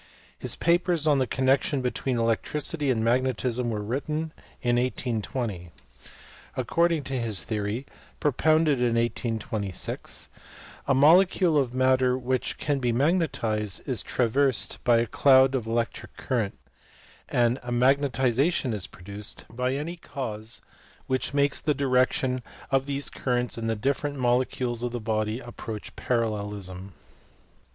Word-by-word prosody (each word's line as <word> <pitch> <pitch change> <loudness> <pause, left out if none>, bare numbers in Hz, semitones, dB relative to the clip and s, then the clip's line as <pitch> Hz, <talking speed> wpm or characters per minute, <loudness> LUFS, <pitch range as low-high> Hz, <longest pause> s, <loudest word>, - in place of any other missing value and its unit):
His - - -1
papers 170 -1 +2
on 145 -3 +4
the 130 - +1
connection 130 +1 +1
between 125 0 -1
electricity 140 +6 0
and 115 -3 +1
magnetism 125 0 +1
were 105 -2 -2
written 150 +7 -3 0.3
in 120 -1 +1
1820. 115 -6 -2 0.9
According 170 -3 +1
to 135 -1 -3
his 110 -8 0
theory, 105 - -3 0.3
propounded 155 0 +3
in 120 -1 +2
1826, 110 -4 -2 0.6
a 135 - +3
molecule 175 +4 +5
of 130 -4 +1
matter 130 0 +3
which 130 0 -2
can 145 -2 0
be 125 -2 +1
mag 140 +8 +3
netized 110 - -2
is - - 0
traversed 130 0 +1
by 120 -1 +5
a 115 - +2
closed 130 +3 +5
electric 115 -2 -2
current, 115 -7 -1 0.7
and 120 +1 +2
magnet 135 +3 +3
ization 130 +2 +1
is 105 -4 -4
produced 100 +4 -9
by 125 +3 -1
any 160 +5 -4
cause 110 -8 -6 0.4
which 130 +2 -2
makes 140 0 +2
the 150 -2 +1
direction 130 -1 +1 0.3
of 135 0 +2
these 140 0 -3
currents 125 -2 -1
in 115 0 -3
the 115 - +1
different 140 +5 -1
molecules 125 -1 0
of 120 0 -2
the 120 - -2
body 110 +1 -1
approach 115 -3 -8
parallelism. 105 -5 -2
125 Hz, 130 wpm, -26 LUFS, 115-140 Hz, 0.9 s, molecule